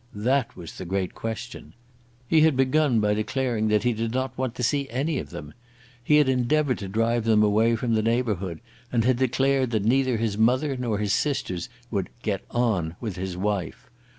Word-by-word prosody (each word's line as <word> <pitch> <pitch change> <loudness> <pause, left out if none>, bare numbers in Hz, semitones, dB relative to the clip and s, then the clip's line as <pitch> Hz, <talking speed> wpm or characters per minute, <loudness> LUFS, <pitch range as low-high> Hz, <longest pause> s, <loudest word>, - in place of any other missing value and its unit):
That 125 +4 0
was 85 -3 -10
the 95 - -5
great 95 +1 -2
question. 115 +1 -6 0.5
He 155 +4 +4
had 155 -4 +4
begun 135 -1 +3
by 105 -1 +2
declaring 115 +1 -1
that 105 -1 +2
he 120 -1 +2
did 115 +1 -2
not 130 +1 -2
want 130 -2 -3
to 125 - -4
see 140 +2 0
any 140 +4 -1
of - - -7
them. 75 - -9 0.5
He 150 - +3
had 150 -2 +5
endeavoured 130 +2 +1
to 100 - -5
drive 115 +3 0
them 110 -1 +4
away 110 +3 +3
from 115 0 -1
the 110 - +2
neighbourhood, 105 -7 -1 0.3
and 115 -2 +1
had 130 -1 +3
declared 130 +1 +1
that 110 -3 -1
neither 130 +1 +2
his 110 -2 -2
mother 130 +5 +2
nor 120 -4 -1
his 105 -1 0
sisters 110 - -1 0.2
would 100 -5 -2
"get 100 -3 -2
on" 100 -9 0
with 110 -6 -4
his 95 -1 -4
wife. 100 -2 -3
115 Hz, 195 wpm, -25 LUFS, 105-130 Hz, 0.5 s, had